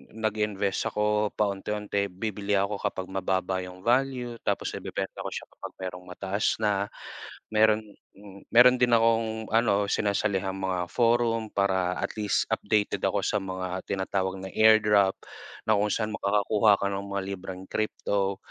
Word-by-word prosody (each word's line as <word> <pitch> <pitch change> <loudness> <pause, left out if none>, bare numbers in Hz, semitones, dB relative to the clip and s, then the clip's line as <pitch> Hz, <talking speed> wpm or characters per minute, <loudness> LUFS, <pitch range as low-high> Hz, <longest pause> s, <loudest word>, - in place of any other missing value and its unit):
nag-invest 105 -3 -1
ako 105 0 +1
paunti-unti. 100 0 -1
Bibili 105 +1 -3
ako 100 +1 0
kapag 95 0 -3
mababa 95 0 -1
yung 90 0 -10
value 125 -1 +1
tapos - - 0
ibebenta - - -5
ko - - -4
siya - - -5
kapag - - -9
merong 90 -1 -6
mataas 95 +3 -1
na. 100 -1 +1 0.7
Meron 110 0 +4 0.7
meron 125 +2 +8
din 120 - +4
akong 115 -1 +2
ano, 105 -3 +3
sinasalihang 100 -2 0
mga 90 -2 -1
forum 115 -2 +2
para 95 -2 +1
at - - -3
least 105 -1 +1
updated 105 0 0
ako - - +1
sa 105 - +1
mga 95 -1 -4
tinatawag 95 0 -1
na 95 - -6
airdrop, 105 -3 +5 0.5
na 110 - +4
kung 105 +1 +1
saan 110 -1 -1
makakakuha 105 +1 +3
ka - - 0
ng 100 0 -3
mga 100 0 -2
libreng 95 0 -8
crypto 100 -2 -1
100 Hz, 145 wpm, -27 LUFS, 95-110 Hz, 0.7 s, meron